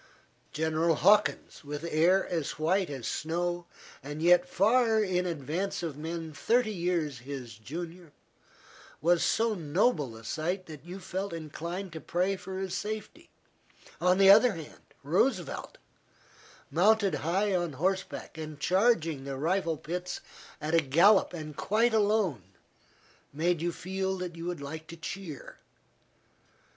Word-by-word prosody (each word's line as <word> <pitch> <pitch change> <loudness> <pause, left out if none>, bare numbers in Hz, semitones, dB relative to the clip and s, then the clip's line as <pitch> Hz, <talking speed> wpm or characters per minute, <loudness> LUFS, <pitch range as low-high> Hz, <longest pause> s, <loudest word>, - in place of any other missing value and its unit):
General 160 +1 +1
Hawkins, 205 +2 +3
with 145 +1 -6
hair 170 +4 +3
as 165 -5 -3
white 175 +3 +1
as 135 -5 -6
snow, 175 +2 -2 0.3
and 145 +2 -6
yet 175 +2 +5
far 220 +2 +3
in 180 -2 0
advance 170 +5 -3
of 160 -4 -3
men 160 +1 -5
thirty 230 +8 +2
years 170 -7 -1
his 130 -2 -7
junior, 165 - -8 0.9
was 170 +2 +3
so 225 0 +2
noble 160 - +1
a 115 - -13
sight 175 - -2
that 150 -4 -10
you 180 +3 -8
felt 190 0 -4
inclined 170 +3 -5
to 160 - -7
pray 185 +3 0
for 190 0 -7
his 190 -1 -3
safety; 215 +10 -5 0.7
on 180 +1 +4
the 195 0 +8
other 220 +3 +7
hand, 160 -4 -10 0.2
Roosevelt, 190 - 0 0.9
mounted 205 +3 +4
high 190 +5 +1
on 175 -4 -1
horseback, 185 +1 -2
and 155 -2 -7
charging 170 - +2
the 135 -1 -5
rifle 165 +2 0
pits 180 +4 -4 0.4
at 155 +2 -3
a 165 - +5
gallop 170 +9 +5
and 155 -3 -7
quite 225 +7 +2
alone, 205 - +2 0.9
made 165 +3 0
you 175 +1 0
feel 190 +2 -3
that 180 -2 -5
you 165 0 -7
would 175 -4 -4
like 155 +3 -7
to 170 - -9
cheer. 165 -3 -7
175 Hz, 140 wpm, -29 LUFS, 155-195 Hz, 0.9 s, the